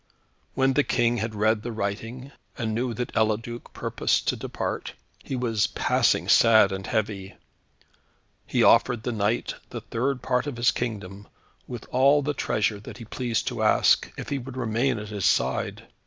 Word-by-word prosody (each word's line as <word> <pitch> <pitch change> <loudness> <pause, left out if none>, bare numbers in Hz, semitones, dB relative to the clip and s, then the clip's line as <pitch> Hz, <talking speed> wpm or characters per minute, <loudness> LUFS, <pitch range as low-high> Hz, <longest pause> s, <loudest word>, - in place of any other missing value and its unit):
When 135 0 +3
the 145 - +3
King 120 -2 +1
had 110 0 -3
read 110 +1 +2
the 120 - -5
writing, 115 +5 -4 0.3
and 110 -3 -2
knew 120 +1 -1
that 125 +2 -4
Eliduc 110 +2 -1
purposed - - -1
to - - +1
depart, - - -4 0.3
he 135 - -4
was 115 -5 +1
passing - - +1
sad 110 -3 +6
and 95 0 -5
heavy. 100 -3 -2 1.1
He - - +2
offered 120 -2 +4
the 120 - -2
knight 110 +1 0 0.2
the - - -6
third 125 +2 -2
part 125 +2 0
of 140 -5 -4
his 120 +1 +4
kingdom, 100 -4 -5 0.4
with 120 -3 -7
all 140 +3 +4
the 145 +1 -1
treasure 105 -5 0
that 105 - -10
he 115 - -9
pleased 120 0 -2
to - - -5
ask, - - +3
if - - -6
he 140 - -1
would 130 0 -9
remain 120 +2 0
at 105 -1 -7
his 100 -4 -3
side. - - 0
115 Hz, 170 wpm, -25 LUFS, 110-125 Hz, 1.1 s, sad